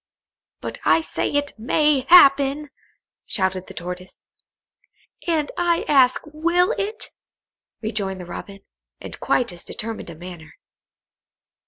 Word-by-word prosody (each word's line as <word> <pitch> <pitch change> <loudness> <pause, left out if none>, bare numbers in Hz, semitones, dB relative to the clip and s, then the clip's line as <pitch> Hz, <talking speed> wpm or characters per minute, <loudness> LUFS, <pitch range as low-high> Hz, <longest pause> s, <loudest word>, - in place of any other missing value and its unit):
"But - - -6
I - - +4
say - - -2
it 290 0 0
may 275 +3 +2
happen," 285 -3 +6 0.6
shouted 190 -2 -1
the - - -11
Tortoise. 180 +1 -8 1.0
"And 315 -3 0
I 345 -1 +1
ask 260 -3 +4
will 340 +4 +1
it?" 425 +3 -4 0.7
rejoined 200 -4 -2
the 180 - -7
Robin, 195 +3 -8 0.4
in - - -8
quite 240 -5 0
as 175 -1 -10
determined 225 -4 -6
a 170 - -9
manner. 175 -1 -11
265 Hz, 120 wpm, -22 LUFS, 190-305 Hz, 1.0 s, happen